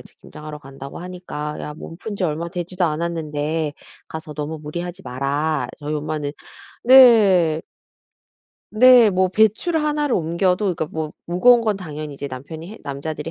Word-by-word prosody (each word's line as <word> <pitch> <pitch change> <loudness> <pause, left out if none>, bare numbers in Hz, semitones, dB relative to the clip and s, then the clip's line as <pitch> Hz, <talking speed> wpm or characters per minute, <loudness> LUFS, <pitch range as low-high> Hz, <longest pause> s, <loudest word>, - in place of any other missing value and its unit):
이제 - - -17
김장하러 150 0 -10
간다고 135 -1 -10
하니까. 175 -4 -6
"야, 150 - -6
몸 165 +1 -10
푼 210 -1 -6
지 185 - -1
얼마 165 +1 -2
되지도 180 +1 -3
않았는데 155 -2 -2 0.3
가서 155 -1 -8
너무 155 +2 -4
무리하지 175 +5 -6
마라." 140 +2 -1
저희 150 +1 -4
엄마는 150 -1 -3 0.5
네. 205 -11 +6 1.1
네. 245 -1 +7
뭐 185 0 +2
배추를 220 - +2
하나를 295 -3 0
옮겨도 180 +4 0
그러니까 160 - -3
뭐 155 0 -5
무거운 235 +8 +5
건 215 -3 0
당연히 155 -5 -7
이제 140 - -6
남편이 140 +5 -8
해 225 - -11
남자들이 150 +3 -5
160 Hz, 335 characters per minute, -21 LUFS, 150-190 Hz, 1.1 s, 네